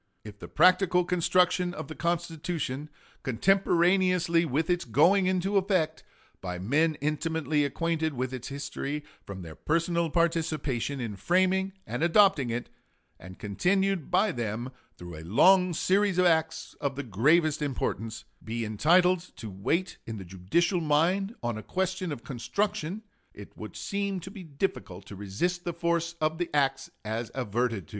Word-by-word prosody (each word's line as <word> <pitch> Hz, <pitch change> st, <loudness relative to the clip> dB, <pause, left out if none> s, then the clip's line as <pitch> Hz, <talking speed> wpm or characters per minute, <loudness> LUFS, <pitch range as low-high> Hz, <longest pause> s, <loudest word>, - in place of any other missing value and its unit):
If 105 Hz, -1 st, -11 dB
the -, -, -8 dB
practical 180 Hz, +1 st, +4 dB
construction 180 Hz, 0 st, +2 dB
of 155 Hz, -, -6 dB
the 155 Hz, -, -7 dB
Constitution, 165 Hz, -4 st, -3 dB, 0.3 s
contemporaneously 175 Hz, -, +2 dB
with 155 Hz, +2 st, 0 dB
its 175 Hz, -1 st, +1 dB
going 170 Hz, -, +4 dB
into 185 Hz, +2 st, +1 dB
effect, 185 Hz, -5 st, +1 dB, 0.4 s
by 90 Hz, -1 st, -4 dB
men 150 Hz, -, +1 dB
intimately 155 Hz, 0 st, 0 dB
acquainted 160 Hz, +1 st, -1 dB
with 130 Hz, +1 st, -3 dB
its 125 Hz, -1 st, -6 dB
history 140 Hz, +1 st, -4 dB, 0.2 s
from 95 Hz, -2 st, -7 dB
their 80 Hz, -2 st, -9 dB
personal 170 Hz, -, 0 dB
participation 155 Hz, -5 st, 0 dB
in 110 Hz, -5 st, -4 dB
framing 185 Hz, -, +1 dB
and 120 Hz, +6 st, -4 dB
adopting 170 Hz, -, +4 dB
it, 120 Hz, +1 st, -3 dB, 0.5 s
and 95 Hz, 0 st, -11 dB
continued 180 Hz, -, 0 dB
by 210 Hz, 0 st, +3 dB
them 120 Hz, -1 st, -4 dB, 0.3 s
through 85 Hz, -2 st, -9 dB
a -, -, -8 dB
long 180 Hz, -, +5 dB
series 190 Hz, +3 st, +1 dB
of 180 Hz, -, +4 dB
acts 160 Hz, -1 st, +1 dB
of 140 Hz, -1 st, -1 dB
the 140 Hz, -, -4 dB
gravest 150 Hz, -, +2 dB
importance, 115 Hz, -5 st, -3 dB, 0.2 s
be 115 Hz, +1 st, -3 dB
entitled 175 Hz, -, +3 dB, 0.2 s
to 110 Hz, -3 st, -8 dB
weight 165 Hz, -, -1 dB
in 115 Hz, -1 st, -5 dB
the 95 Hz, -, -8 dB
judicial 95 Hz, -, 0 dB
mind 175 Hz, +8 st, +1 dB
on 120 Hz, -2 st, -2 dB
a -, -, -7 dB
question 185 Hz, +3 st, -2 dB
of 130 Hz, -6 st, -6 dB
construction, 200 Hz, -, -2 dB, 0.3 s
it -, -, -12 dB
would -, -, -9 dB
seem 200 Hz, -2 st, -2 dB
to 190 Hz, -, -9 dB
be 200 Hz, -, -9 dB
difficult 140 Hz, -, -4 dB
to 100 Hz, -, -10 dB
resist 105 Hz, -, -2 dB
the 175 Hz, -, -3 dB
force 170 Hz, 0 st, -1 dB
of 155 Hz, +1 st, 0 dB
the 175 Hz, -, -1 dB
acts 140 Hz, -2 st, +1 dB, 0.2 s
above 110 Hz, +2 st, -3 dB
adverted 115 Hz, -, -1 dB
to." -, -, -23 dB
160 Hz, 155 wpm, -28 LUFS, 120-180 Hz, 0.5 s, long